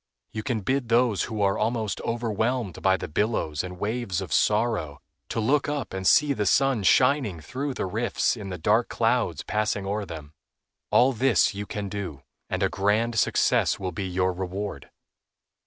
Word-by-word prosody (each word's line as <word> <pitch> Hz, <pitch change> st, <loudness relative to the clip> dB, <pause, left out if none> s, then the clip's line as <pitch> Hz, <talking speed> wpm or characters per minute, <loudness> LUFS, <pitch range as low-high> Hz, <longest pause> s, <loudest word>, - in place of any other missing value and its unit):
You 110 Hz, -, -4 dB
can 110 Hz, -1 st, -2 dB
bid 130 Hz, +3 st, -1 dB
those 115 Hz, -3 st, +3 dB
who 110 Hz, -3 st, -2 dB
are 100 Hz, 0 st, +1 dB
almost 110 Hz, -2 st, -1 dB
overwhelmed 115 Hz, -3 st, -2 dB
by 95 Hz, -1 st, +3 dB
the -, -, -5 dB
billows 80 Hz, -5 st, -1 dB
and 90 Hz, 0 st, -7 dB
waves 105 Hz, -2 st, -2 dB
of 95 Hz, -6 st, -4 dB
sorrow, 105 Hz, -, +1 dB, 0.3 s
to -, -, -2 dB
look 140 Hz, +7 st, +1 dB
up 145 Hz, -8 st, -3 dB
and 95 Hz, 0 st, -2 dB
see 150 Hz, -1 st, +5 dB
the 105 Hz, -6 st, -1 dB
sun 135 Hz, -2 st, +3 dB
shining 125 Hz, -, +3 dB
through 130 Hz, -, -4 dB
the -, -, -2 dB
rifts 115 Hz, +7 st, 0 dB
in 105 Hz, -4 st, -7 dB
the 90 Hz, -, -5 dB
dark 80 Hz, -, +2 dB
clouds -, -, 0 dB
passing 105 Hz, -2 st, -1 dB
o'er 100 Hz, +1 st, -2 dB
them. 80 Hz, -3 st, -9 dB, 0.6 s
All 130 Hz, +2 st, +4 dB
this 120 Hz, -1 st, +3 dB, 0.2 s
can 105 Hz, -1 st, -4 dB
you -, -, -5 dB
do, 95 Hz, -9 st, -6 dB, 0.3 s
and -, -, -1 dB
a -, -, +4 dB
grand 110 Hz, +3 st, +1 dB
success -, -, +2 dB
will 95 Hz, -2 st, -3 dB
be 95 Hz, -1 st, -4 dB
your 90 Hz, 0 st, 0 dB
reward. 95 Hz, +3 st, -5 dB
105 Hz, 175 wpm, -26 LUFS, 95-120 Hz, 0.6 s, see